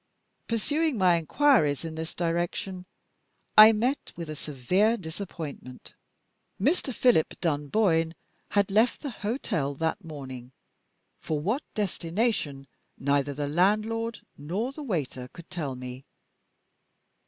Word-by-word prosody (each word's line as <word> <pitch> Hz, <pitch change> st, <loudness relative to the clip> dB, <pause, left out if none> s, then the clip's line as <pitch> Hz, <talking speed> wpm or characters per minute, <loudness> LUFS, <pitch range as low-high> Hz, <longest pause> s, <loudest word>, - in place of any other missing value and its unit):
Pursuing 290 Hz, +5 st, 0 dB
my 180 Hz, -3 st, +5 dB
inquiries 165 Hz, -, +3 dB
in 160 Hz, -, -5 dB
this 160 Hz, +1 st, -6 dB
direction, 175 Hz, +2 st, -2 dB, 0.7 s
I 215 Hz, +1 st, +11 dB
met 245 Hz, +6 st, -1 dB
with 165 Hz, -2 st, -6 dB
a -, -, -5 dB
severe 180 Hz, -, +1 dB
disappointment. 160 Hz, -, -7 dB, 0.7 s
Mr. 280 Hz, -, +1 dB
Philip 240 Hz, -9 st, +2 dB
Dunboyne 165 Hz, +1 st, +1 dB, 0.3 s
had 200 Hz, -1 st, +2 dB
left 220 Hz, +4 st, +3 dB
the 285 Hz, -, -4 dB
hotel 205 Hz, -, -2 dB
that 160 Hz, +7 st, -1 dB
morning; 130 Hz, -5 st, -8 dB, 0.7 s
for 155 Hz, -2 st, -2 dB
what 215 Hz, -, 0 dB
destination 175 Hz, -, -1 dB, 0.3 s
neither 140 Hz, 0 st, +1 dB
the 145 Hz, 0 st, -2 dB
landlord 215 Hz, +8 st, +1 dB, 0.2 s
nor 190 Hz, -, -2 dB
the 300 Hz, -, -9 dB
waiter 145 Hz, -, -3 dB
could 170 Hz, +1 st, -13 dB
tell 150 Hz, -7 st, -3 dB
me. 125 Hz, +1 st, -8 dB
175 Hz, 115 wpm, -27 LUFS, 145-220 Hz, 0.7 s, I